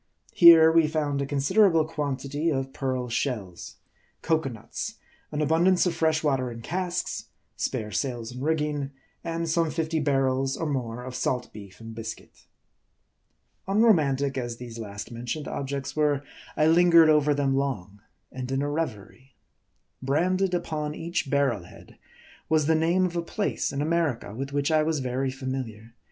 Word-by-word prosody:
Here, 165 -2 +9
we 165 -1 +4
found 150 -2 -1
a 140 - -2
considerable 160 +4 +3
quantity 145 0 -2
of 135 -3 -2
pearl 130 -2 -2
shells; 115 -7 -3 0.5
cocoanuts; 160 - -2 0.4
an 150 0 -1
abundance 175 +5 +3
of 180 - +1
fresh 160 -1 +1
water 135 -4 +1
in 115 -1 -8
casks; 180 +2 -3 0.3
spare 105 -1 -3
sails 120 -3 -3
and 125 +1 -8
rigging; 150 -2 -1 0.3
and 165 0 -3
some 165 0 +1
fifty 160 0 -1
bar 140 -2 +2
rels 135 +1 0
or 165 - -1
more 125 -5 -3
of 130 0 -7
salt 125 0 -2
beef 100 -3 -11
and 115 0 -9
biscuit. 115 0 -9 1.2
Unromantic 150 - +3
as 120 -2 -4
these 115 -1 -8
last 105 -1 -7
mentioned 120 +5 -5
objects 140 0 -4
were, 145 -2 +1 0.3
I 155 - +4
lingered 170 0 +6
over 150 -1 +3
them 140 -1 +1
long, 105 -8 -3 0.3
and 130 0 -6
in 135 +1 0
a 145 - -1
revery. 130 -3 -5 0.7
Branded 180 +7 +1
upon 155 -3 -3
each 170 -3 -3
barrel 130 -10 +1
head - - -16 0.5
was 155 -1 +3
the 160 - +3
name 170 +4 +2
of 175 -1 -3
a 170 - 0
place 200 +4 -2
in 140 +1 -2
America, 155 -10 -1
with 135 +4 -5
which 145 +2 0
I 155 -1 +4
was 155 -1 0
very 130 +1 -1
familiar. 130 -4 -6
140 Hz, 155 wpm, -26 LUFS, 130-160 Hz, 1.2 s, Here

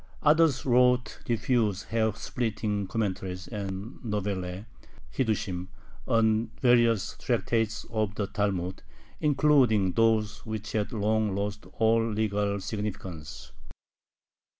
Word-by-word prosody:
Others 155 -2 +4
wrote 125 0 +3
diffuse 115 -4 +1
hair 110 -1 +1
splitting 105 -3 -2
commentaries 95 -4 -3
and 100 +1 -5
novellae 100 -3 -3 0.5
(hiddushim) 100 -7 -1 0.4
on 110 0 +2
various 120 -4 +3
tractates 115 -2 0
of 110 -3 -1
the 105 - -1
Talmud, 95 -2 -2 0.4
including 135 -9 +3
those 110 -1 +1
which 110 -1 -5
had 105 -2 -1
long 110 -2 +1
lost 105 +1 -3
all 115 0 +3
legal 105 -2 0
significance. 95 -8 -6
110 Hz, 100 wpm, -28 LUFS, 100-115 Hz, 0.5 s, Others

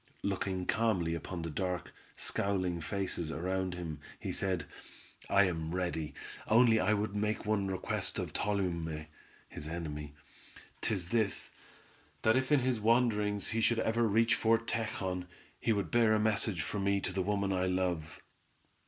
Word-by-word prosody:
Looking 95 -2 -1
calmly 105 -8 +1
upon 85 +1 -4
the 85 - -3
dark, 90 +3 -2 0.2
scowling 90 -4 0
faces 85 -2 -2
around 90 +3 -1
him, 80 -4 -5 0.2
he - - -3
said: 95 -6 -1 0.6
"I 100 - +6
am 80 -2 -1
ready, 85 -4 -2 0.3
only 115 0 +6
I 100 - +2
would 105 0 -2
make 105 +1 -1
one 105 -2 +1
request 95 -1 -1
of - - -3
Tolume 85 -6 -1 0.4
(his 75 - -6
enemy), 75 -3 -5 0.7
'tis 95 -5 -1
this; 110 -3 0 0.7
that 110 +1 +5
if 130 +2 +1
in 145 -3 +5
his 125 -2 +1
wanderings 105 -3 +2
he 115 0 0
should 115 +1 +3
ever 115 +1 +1
reach 115 +3 +4
Fort 115 -1 +2
Tejon, 95 -6 -2 0.3
he - - +1
would 100 -6 0
bear 115 -2 +5
a - - +2
message 105 -4 +1
for 105 - -3
me 100 0 +2
to 95 - -3
the 95 - 0
woman 100 0 0
I 95 0 +1
love." 90 -4 -1
95 Hz, 155 wpm, -33 LUFS, 90-110 Hz, 0.7 s, I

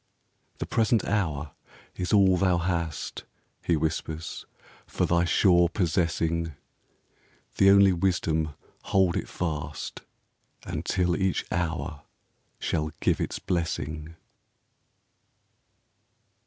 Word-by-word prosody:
"The - - -3
present 115 -2 +2
hour 80 -8 -1 0.4
is 90 - -3
all 95 -3 +5
thou 90 -1 +2
hast," 85 -3 -2 0.4
He 85 - +2
whispers, 80 +1 -3 0.2
" - - -23
for - - 0
thy 85 0 +2
sure 85 -1 +4
possessing! 85 -2 0 1.0
The 95 - +6
only 100 -1 +7
wisdom, 80 -4 0 0.3
hold 95 -3 +3
it - - -3
fast, 75 -4 -4 0.6
Until 90 -2 0
each 95 0 0
hour 85 -3 -2 0.6
shall 80 -1 -1
give - - +1
its - - -2
blessing." 80 -3 -3
85 Hz, 100 wpm, -27 LUFS, 80-95 Hz, 1.0 s, only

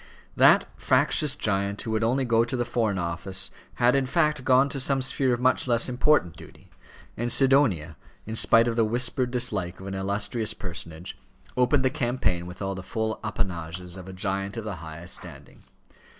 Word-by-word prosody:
That - - +6
fractious 150 -2 +2
giant 100 -4 -1
who 110 - -4
would 110 0 0
only 130 +4 +1
go 115 -1 +3
to 120 +2 -3
the 120 - -1
Foreign 115 -4 -1
Office 90 +2 -1 0.2
had, 120 +2 +3
in 135 -1 +1
fact, 150 -2 +1
gone 130 +2 +4
to 140 - -4
some 135 +1 +1
sphere 130 0 +1
of 120 - 0
much 130 +1 +2
less 120 -1 +3
important 125 - +2
duty, - - -15 0.4
and 120 +1 -2
Sidonia, 120 - +3 0.3
in 110 - -6
spite 115 +1 +4
of 115 - -1
the 115 - +3
whispered 120 +3 0
dislike 105 -8 -2
of 95 - -10
an 95 - -5
illustrious 100 +4 -2
personage, 85 -2 -7 0.4
opened 130 +2 +2
the 130 - +2
campaign 120 -10 -1
with 90 +3 -8
all 95 0 -2
the 95 - -6
full 110 +3 -3
appanages 90 -4 -4
of 95 -1 -10
a - - -6
giant 95 +2 -3
of 115 - -4
the 105 -4 -5
highest 80 +2 -8
standing. - - -9
110 Hz, 185 wpm, -26 LUFS, 95-125 Hz, 0.4 s, That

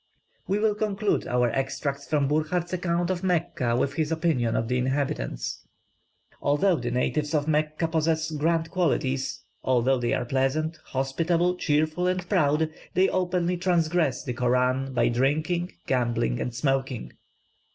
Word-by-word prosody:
We 195 - +1
will 215 0 +2
conclude 210 -1 -1
our 125 -1 +2
extracts 140 +1 -2
from 145 -3 +2
Burckhardt's 155 +4 0
account 175 0 0
of 180 -1 -2
Mecca 165 -9 0
with 135 +3 0
his 155 +1 -1
opinion 155 -8 +1
of 115 - 0
the 125 +1 0
inhabitants. 130 - -2 0.8
"Although 165 +5 +3
the 120 -3 -3
natives 145 +5 0
of 150 0 0
Mecca 155 +1 +1
possess 160 0 0
grand 165 +2 0
qualities, 140 -7 0 0.2
although 130 +1 +2
they 120 -1 +1
are - - -2
pleasant, 140 +5 0
hospitable, 165 +7 0
cheerful 155 +1 +1
and 180 -1 -1
proud, 155 -4 +2 0.2
they 185 +2 +4
openly 180 -1 0
transgress 170 -5 +1
the 125 - -3
Koran 125 +2 +1
by 130 - +2
drinking, 155 +8 0
gambling, 120 -2 0
and 120 - -3
smoking. 135 - -1
150 Hz, 140 wpm, -26 LUFS, 130-170 Hz, 0.8 s, they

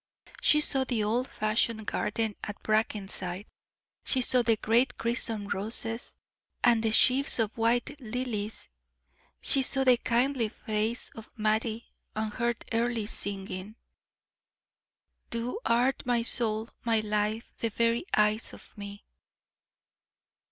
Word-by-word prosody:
She 300 - +5
saw 270 -3 +1
the 240 -5 -1
old 235 +5 0
fashioned 215 0 0
garden 215 +1 -1
at 210 - -7
Brackenside; 200 -3 -1 0.6
she 260 - +3
saw 250 0 +4
the 230 -1 +3
great 235 +5 +2
crimson 230 -3 -1
roses, 225 +3 -2 0.5
and 235 -2 +5
the 225 - +1
sheaves 260 +5 +5
of 225 -1 0
white 240 +4 0
lilies; 225 -3 -3 0.8
she 275 - +4
saw 270 +1 +1
the 255 -2 +5
kindly 240 0 +1
face 220 +2 -2
of 225 0 -10
Mattie, 220 +1 -1 0.2
and 215 0 -2
heard 235 -1 -2
Earle 230 -1 0
singing: 195 -1 -4 1.5
"Thou 235 - -3
art 245 +3 +2
my 240 -1 +1
soul, 225 -2 -1
my 225 -2 +2
life 210 +2 -2
the 230 - 0
very 230 +3 +1
eyes 210 +1 +2
of - - -14
me." 200 -1 -9
225 Hz, 125 wpm, -29 LUFS, 215-240 Hz, 1.5 s, She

